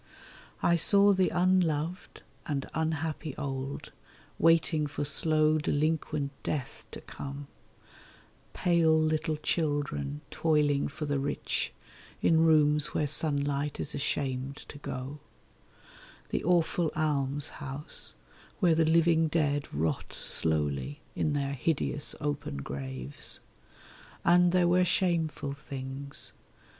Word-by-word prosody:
I 170 - +4
saw 200 +4 +6
the 185 -1 +2
unloved 175 -2 0 0.2
and 140 -2 -2
unhappy 160 -2 -2
old, 135 0 -5 0.5
waiting 165 -2 +3
for 145 0 -3
slow 155 +1 +3
delinquent 150 -1 -1
death 140 -5 -4
to - - -7
come; 140 +1 -7 1.1
Pale 165 -3 +3
little 155 0 0
children 145 - -1
toiling 150 -3 +2
for 150 +2 -5
the 145 -1 0
rich, 140 +1 -1 0.5
in 160 -1 +4
rooms 150 -2 +4
where 150 - +1
sunlight 145 -1 0
is 150 - -3
ashamed 135 -1 -2
to 145 - -9
go; 135 +1 -6 1.1
The - - -2
awful 170 -1 +2
almshouse, 145 -1 0 0.4
where 180 -5 +4
the 160 0 +3
living 165 0 +4
dead 145 -3 0
rot 80 +1 -2
slowly 80 - 0 0.2
in 150 - 0
their 140 -1 -1
hideous 145 +1 -1
open 145 - -3
graves. 65 0 -4 0.9
And 175 0 +5
there 180 -1 +3
were 180 +1 +4
shameful 165 -6 0
things. 140 0 -6
150 Hz, 105 wpm, -29 LUFS, 140-160 Hz, 1.1 s, saw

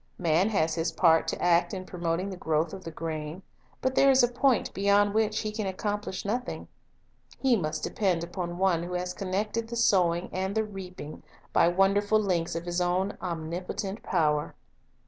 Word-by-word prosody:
Man 175 +3 +2
has 160 -7 +1
his 165 +1 -1
part 165 -3 +4
to - - -2
act 175 +3 +2
in 185 -1 -6
promoting 175 +2 -2
the - - -5
growth 160 -2 -1
of 190 -1 -8
the 165 - -6
grain; 160 +1 -5 0.4
but 260 - 0
there 275 +1 +5
is 265 -2 +6
a - - +6
point 245 0 +1
beyond 200 +1 +3
which 215 0 +1
he 215 - -3
can 215 -2 -3
accomplish 205 0 -3
nothing. 245 +5 -3 0.7
He 265 -3 +3
must 155 -6 -2
depend 185 -5 0
upon 175 0 -5
One 185 -3 +2
who 175 +1 -5
has 180 0 -2
connected 205 +5 -2
the 235 - -6
sowing 180 -6 +2
and 190 +2 -2
the 220 - +2
reaping 185 -7 -8 0.3
by - - +5
wonderful 200 +4 +3
links 175 -6 0
of 165 +1 -4
His 175 0 -1
own 180 +3 0
omnipotent 180 +4 -4
power. 150 -4 0
185 Hz, 180 wpm, -28 LUFS, 170-205 Hz, 0.7 s, is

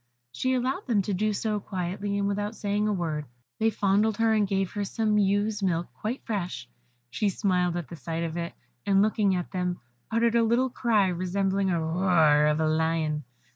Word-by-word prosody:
She 260 - 0
allowed 260 +9 -2
them 215 -5 +2
to 200 - -2
do 215 +3 +1
so 210 0 -1
quietly, 195 +1 -3
and 200 0 0
without 205 +2 -2
saying 205 0 -1
a - - +1
word. 160 -6 -2 0.3
They 225 - +3
fondled 205 +1 +1
her, 225 -1 +3
and 210 -2 +2
gave 195 -1 0
her 205 - -2
some 210 +1 +1
ewe's 205 +1 +1
milk 175 -3 -1
quite 230 +5 -5
fresh. 180 - -3 0.4
She 200 - 0
smiled 180 -3 0
at 170 -5 -4
the 170 - -8
sight 165 +3 -4
of 165 -1 -3
it, 170 0 -4 0.3
and 195 0 +4
looking 210 -2 +2
at 180 -1 -3
them, 180 -2 -2 0.3
uttered 230 +1 +2
a 235 - +4
little 240 +3 +2
cry 215 -6 +2
resembling 190 +2 0
the 175 -3 +1
roar 160 -3 +3
of 150 +1 +1
a 160 - +2
lion. 155 -2 0
195 Hz, 195 wpm, -27 LUFS, 175-215 Hz, 0.4 s, and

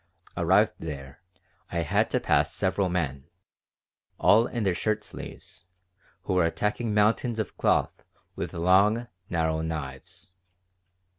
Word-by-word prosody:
Arrived - - +3
there, 70 -4 -7 0.5
I 85 - 0
had 80 - +1
to - - +1
pass - - +2
several 95 0 0
men, 75 -7 -2 0.9
all 115 +4 +5
in 120 -3 -3
their 95 -3 +2
shirt 110 +4 -1
sleeves, 90 - -10 0.6
who 95 - -2
were 90 -2 +3
attacking 105 +6 -1
mountains 110 +3 +2
of 110 -3 -3
cloth - - +1 0.3
with - - -4
long, 100 +7 +3 0.2
narrow 80 -2 0
knives. 80 +2 -6
90 Hz, 125 wpm, -27 LUFS, 80-105 Hz, 0.9 s, all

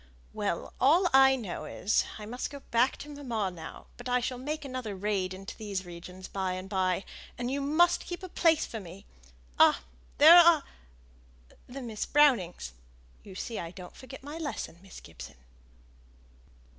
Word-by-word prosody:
"Well, - - -3
all 330 +8 +5
I 265 0 +7
know 215 -9 -5
is, 205 - 0
I 210 - -8
must 245 +4 -4
go 280 -1 -9
back 235 +3 +3
to 295 - -9
mamma 220 -7 -1
now; 165 -2 -10
but 245 +1 -7
I 250 0 +3
shall 250 +1 -3
make 300 +3 -4
another 255 -6 -5
raid 190 -1 -1
into 190 +2 -8
these 200 -4 -4
regions 180 +2 -10
by 190 -2 -2
and 185 +1 -6
by, 190 -1 0 0.3
and 245 +1 -3
you 280 +1 -1
must 315 +5 +2
keep 350 +1 -6
a - - -5
place 330 -3 +2
for 225 - -6
me. 185 0 -11 0.5
Ah! - - +5 0.3
there 315 +4 +10
are 340 -3 +7 1.0
Miss 245 -4 -5
Brownings; 225 - +2 0.5
you 195 - -12
see 225 +3 -5
I 170 - -5
don't 180 0 -11
forget 265 0 -11
my 295 +3 -7
lesson, 290 - -5
Miss 195 -1 -12
Gibson." 60 -7 -11
230 Hz, 165 wpm, -29 LUFS, 185-280 Hz, 1.0 s, there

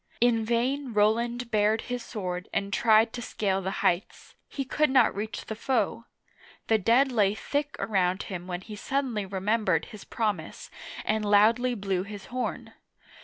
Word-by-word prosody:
In 235 -2 +3
vain 245 +3 -1
Roland 235 +3 +1
bared 215 +1 +2
his 245 0 -4
sword 180 -4 -5
and 200 0 -2
tried 225 0 +4
to 240 - -5
scale 195 -4 -1
the 190 - -2 0.2
heights; 175 +2 -1 0.2
he 275 - -4
could 300 +3 +1
not 260 -3 +4
reach 205 +1 -5
the - - -4
foe! 230 -1 -1 0.6
The 220 -1 +3
dead 245 +7 +3
lay 210 -4 +2
thick 290 +4 -2
around 190 -5 0
him 180 -2 -6
when 180 -1 -4
he 210 +2 -9
suddenly 240 -3 -2
remembered 210 +4 0
his 215 -4 -11
promise 205 -8 -3 0.3
and 215 0 0
loudly 225 +5 +4
blew 195 -3 -1
his 200 0 -8
horn. 255 -1 -3
220 Hz, 160 wpm, -27 LUFS, 200-240 Hz, 0.6 s, tried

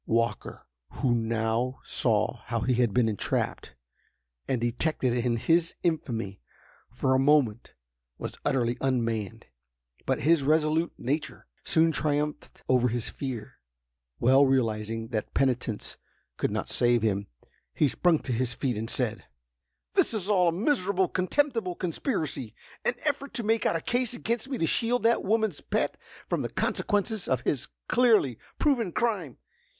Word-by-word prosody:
Walker, 115 +1 -1 0.3
who 130 -4 +1
now 115 +2 0
saw 110 -1 +1
how 115 0 -2
he 130 - +1
had 120 -2 +2
been 120 +1 +3
entrapped, 105 -3 -2 0.7
and 130 - 0
detected 125 +2 0
in 120 -1 0
his 165 +8 +2
infamy, 115 - -2 0.5
for 130 +2 +1
a 130 - +3
moment 135 -5 +2 0.4
was - - -6
utterly 120 -2 0
unmanned. 115 -4 -1 0.6
But, - - +1
his 160 +4 +4
resolute 155 +3 +2
nature 145 +5 -3 0.2
soon 160 0 +3
triumphed 150 0 -2
over 125 -1 +3
his 120 0 -2
fear. 125 -6 -6 0.6
Well 130 +3 +5
realizing 115 -4 0
that 110 -3 -4
penitence 125 -5 -1 0.4
could - - 0
not - - -3
save 120 -2 +2
him, 100 -2 0 0.5
he 150 - +3
sprung 170 +5 +2
to 130 - -4
his 120 0 -1
feet 125 -6 -1
and 115 +1 -3
said: 115 -4 0 0.7
"This - - +3
is 200 -3 -1
all 185 -4 +4
a - - +4
miserable, 190 - +1
contemptible 220 -1 0
conspiracy—an 165 - -3
effort 285 -2 -1
to 235 - -1
make 225 0 +2
out - - +1
a 165 - -1
case 245 +3 0
against 235 +1 -2
me 265 - -2
to 165 - +1
shield 235 +9 +1
that 230 +1 +3
woman's 220 0 0
pet - - -1 0.3
from - - -1
the - - -3
consequences 205 0 -1
of 130 -2 +1
his 135 - -1 0.2
clearly 220 - +3 0.2
proven 245 - +1
crime. 230 +3 -1
135 Hz, 145 wpm, -28 LUFS, 120-185 Hz, 0.7 s, Well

